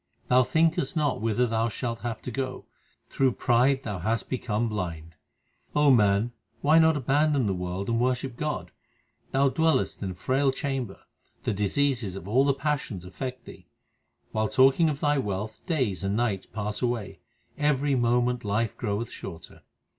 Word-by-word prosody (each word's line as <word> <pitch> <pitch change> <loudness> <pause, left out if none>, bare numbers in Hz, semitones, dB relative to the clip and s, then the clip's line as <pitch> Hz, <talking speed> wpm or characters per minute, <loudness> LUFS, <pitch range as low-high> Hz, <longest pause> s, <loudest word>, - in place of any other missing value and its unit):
Thou 125 +1 +6
thinkest 160 +2 +1
not 145 -7 0
whither 115 +2 +2
thou 115 0 0
shalt 115 +1 -4
have 115 -2 -5
to 125 - -5
go: 130 +1 -4 0.4
through 135 -2 +1
pride 130 +4 +2
thou 105 -5 -4
hast 110 +5 -1
become 120 -3 -1
blind. 85 -6 -4 0.6
O 150 -1 +5
man, 105 -1 +3 0.3
why 155 +3 +5
not 160 -1 +5
abandon 145 0 +2
the 100 - +1
world 90 +1 -4
and 115 0 +1
worship 125 0 0
God? 150 +3 -3 0.6
Thou 135 +1 +3
dwellest 155 -7 +1
in 100 - -2
a 90 - -6
frail 135 +7 +1
chamber: 130 -6 -3 0.4
the - - 0
diseases 105 0 0
of 95 -1 -8
all 125 +6 +4
the 140 - +3
passions 140 - -2
affect 130 +7 -6
thee. - - -13 0.6
While 110 -1 0
talking 135 +5 +5
of 145 -1 -4
thy 145 -1 +2
wealth 105 -1 -4
days 125 - 0
and 100 +1 0
nights 105 -6 -1
pass 105 0 -4
away; 120 -5 -2 0.4
every 145 -1 +1
moment 120 0 +1
life 105 +1 -1
groweth 110 0 -2
shorter. 85 -3 -9
120 Hz, 160 wpm, -27 LUFS, 105-135 Hz, 0.6 s, Thou